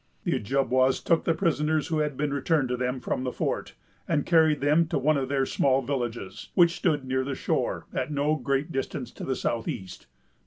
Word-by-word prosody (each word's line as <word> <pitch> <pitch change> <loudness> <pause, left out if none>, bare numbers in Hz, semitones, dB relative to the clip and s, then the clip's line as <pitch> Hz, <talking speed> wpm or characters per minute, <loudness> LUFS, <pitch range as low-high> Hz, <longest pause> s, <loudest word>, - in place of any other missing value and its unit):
The - - 0
Ojibwas 130 +2 +2
took 165 -1 +1
the 165 - +2
prisoners 155 -3 0
who 160 -1 0
had 150 -3 -1
been 145 -1 -1
returned 140 -1 +1
to 125 - 0
them 125 +1 -2
from 125 - -2
the 130 - -2
fort, - - -3 0.3
and 150 -4 +1
carried 160 -3 +4
them 150 +4 +3
to - - -1
one 155 +2 +2
of 135 -2 -1
their 135 -1 +1
small 135 0 +2
villages, 120 -6 -4
which 170 -1 +5
stood 150 -6 0
near 130 0 0
the 135 0 -3
shore, - - -1
at - - -2
no 145 +1 +1
great 140 +2 -1
distance 135 -2 -3
to - - -9
the 130 - -1
south 115 -2 -2
east. 95 -2 -6
140 Hz, 205 wpm, -27 LUFS, 130-155 Hz, 0.3 s, which